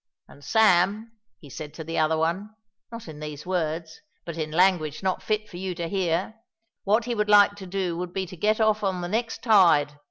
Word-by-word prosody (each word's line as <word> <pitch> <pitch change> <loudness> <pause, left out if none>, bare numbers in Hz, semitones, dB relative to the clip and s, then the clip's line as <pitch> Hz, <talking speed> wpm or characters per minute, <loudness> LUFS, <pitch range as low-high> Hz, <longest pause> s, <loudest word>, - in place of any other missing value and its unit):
And 145 - -17
Sam, 215 +2 +3 0.3
he 145 - -15
said 150 +3 -9
to 160 - -7
the 165 +1 -3
other 160 0 +2
one 185 +7 -2 0.4
not 230 -4 -9
in 155 -2 -9
these 150 0 -7
words, 165 -2 -3 0.2
but 170 - -6
in 155 -2 -3
language 170 -2 +1
not 185 -1 -1
fit 215 0 -2
for 175 - -10
you 185 0 -4
to 170 -1 -4
hear 190 +3 -1 0.5
what 215 +3 +2
he 245 - -2
would 210 -2 -1
like 205 -1 +6
to 190 -2 -9
do 185 -2 -2
would 180 -1 -4
be 190 +1 -3
to 180 - -10
get 215 +5 +1
off 215 -1 +2
on 190 -2 -1
the 175 - -3
next 225 +4 -3
tide. 165 - +4
180 Hz, 215 wpm, -25 LUFS, 160-210 Hz, 0.5 s, like